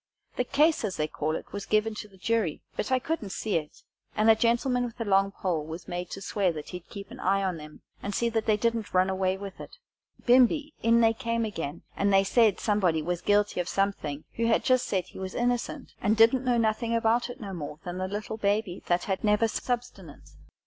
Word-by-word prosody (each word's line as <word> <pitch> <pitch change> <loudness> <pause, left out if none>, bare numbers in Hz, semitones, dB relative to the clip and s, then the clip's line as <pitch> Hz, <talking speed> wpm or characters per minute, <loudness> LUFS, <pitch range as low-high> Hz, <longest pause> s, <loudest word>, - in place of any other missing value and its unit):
The - - +1
case, 300 +3 +3
as 195 -4 -2
they 155 -1 0
call 155 +1 -2
it, - - -8
was 200 0 -5
given 215 +1 +2
to 210 - -7
the 195 -2 -20
jury, 210 -5 -1
but 210 - -3
I 260 - +5
couldn't 255 -5 -3
see 205 0 -1
it, 150 -2 -7 0.3
and 220 +1 +5
a - - +6
gentleman 240 +3 +2
with 240 0 -6
a 230 - -2
long 195 -1 +3
pole 175 -6 -2
was 160 +3 -8
made 175 0 -4
to 195 - -7
swear 195 -2 +1
that 150 -2 -7
he'd 180 -1 -8
keep 200 -1 -9
an - - -10
eye 195 +1 +1
on 185 -4 -2
'em, 150 0 -12 0.2
and 200 0 -4
see 235 - +1
that 225 -1 -1
they 215 -1 +4
didn't 230 -2 -1
run 185 +1 +4
away 190 0 0
with 195 -1 -8
it. - - -10 0.5
Bimeby 260 +5 +4
in 230 +1 +4
they 225 0 +5
came 230 -1 -1
again, 165 -7 -5
and 200 0 +1
they 195 0 +5
said 215 0 +3
somebody 185 -7 +1
was 175 +1 -2
guilty 205 -2 +2
of 175 - -2
something, 175 -7 -1
who 230 0 +1
had 230 - +3
just 255 -1 +2
said 190 -2 0
he - - -12
was 190 0 -5
innocent, 245 0 -1
and 215 +1 +2
didn't 235 +3 +5
know 245 -1 +3
nothing 230 +1 +1
about 230 +2 +2
it 245 - -8
no 200 -3 -6
more 150 -3 -6
than 180 0 -5
the 185 - -1
little 210 +2 -4
baby 200 -3 0
that 175 0 +2
had 190 -2 -2
never 210 +1 +3
subsistence. 225 - -5
205 Hz, 230 wpm, -28 LUFS, 185-230 Hz, 0.5 s, a